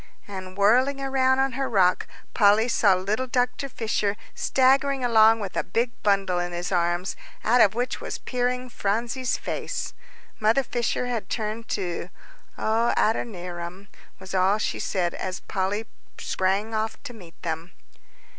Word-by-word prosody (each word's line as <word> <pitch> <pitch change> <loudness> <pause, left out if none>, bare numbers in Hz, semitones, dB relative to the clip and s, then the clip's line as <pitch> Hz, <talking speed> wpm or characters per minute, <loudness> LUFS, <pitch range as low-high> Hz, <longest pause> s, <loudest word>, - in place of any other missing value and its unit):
And 190 -1 -8
whirling 250 +7 +4
around 265 -1 +2
on 270 0 +2
her 270 +2 -2
rock, 185 -4 +3 0.3
Polly 210 +2 +5
saw 205 -5 +4
little 205 +8 -1
Dr. 250 +1 0
Fisher 215 -4 -1 0.2
staggering 270 0 +2
along 225 -1 +6
with 195 -3 -5
a - - +1
big 235 +6 0
bundle 195 -3 +2
in 175 0 -3
his 175 +2 -3
arms, 175 +1 0 0.3
out 240 +3 +4
of 205 - +5
which 245 +2 -2
was - - -4
peering 250 0 -2
Phronsie's 235 +3 -1
face. - - -4 0.5
Mother 220 +5 +3
Fisher 240 0 -1
had 235 -5 -3
turned 220 0 -3
too. 180 -2 -3 0.5
"Oh, 225 +2 +1
Adoniram!" 180 -3 -2 0.3
was 190 0 -10
all 190 +2 +3
she 215 - -2
said, 175 -3 -1
as 185 0 -4
Polly 200 +3 -2 0.3
sprang 195 +4 -1
off 220 0 -1
to 245 - -7
meet 180 -7 -14
them. 165 +1 -4
215 Hz, 145 wpm, -25 LUFS, 185-245 Hz, 0.5 s, along